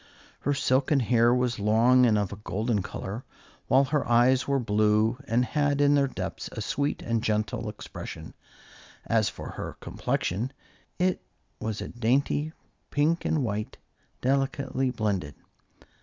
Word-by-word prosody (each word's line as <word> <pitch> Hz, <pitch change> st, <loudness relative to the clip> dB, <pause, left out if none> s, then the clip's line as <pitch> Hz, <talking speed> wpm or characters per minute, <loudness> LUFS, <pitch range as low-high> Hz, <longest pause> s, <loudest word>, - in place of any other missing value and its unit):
Her 145 Hz, -, 0 dB
silken 135 Hz, +1 st, +2 dB
hair 120 Hz, -1 st, +4 dB
was 125 Hz, -2 st, +1 dB
long 120 Hz, +5 st, +5 dB
and 110 Hz, -2 st, +3 dB
of 100 Hz, -1 st, -1 dB
a -, -, -8 dB
golden 105 Hz, +1 st, -1 dB
color, 100 Hz, +5 st, -6 dB, 0.4 s
while 135 Hz, +1 st, +5 dB
her 145 Hz, +1 st, 0 dB
eyes 125 Hz, +3 st, +4 dB
were 140 Hz, 0 st, +2 dB
blue, 110 Hz, 0 st, +2 dB
and 120 Hz, +2 st, +2 dB
had 145 Hz, +1 st, +1 dB
in 145 Hz, 0 st, +5 dB
their 140 Hz, -1 st, +3 dB
depths -, -, -5 dB
a -, -, -6 dB
sweet 140 Hz, +1 st, -1 dB
and 115 Hz, -1 st, -1 dB
gentle 105 Hz, -1 st, -1 dB
expression. -, -, -8 dB, 0.7 s
As -, -, +2 dB
for -, -, -8 dB
her -, -, -6 dB
complexion, 115 Hz, +10 st, -2 dB, 0.4 s
it 180 Hz, 0 st, +1 dB, 0.4 s
was 110 Hz, -2 st, -3 dB
a -, -, -4 dB
dainty 135 Hz, +6 st, 0 dB, 0.4 s
pink 155 Hz, +4 st, +1 dB
and 155 Hz, -4 st, +1 dB
white, 105 Hz, -2 st, -3 dB, 0.4 s
delicately 135 Hz, 0 st, 0 dB
blended. 100 Hz, -, -2 dB
125 Hz, 140 wpm, -27 LUFS, 110-140 Hz, 0.7 s, long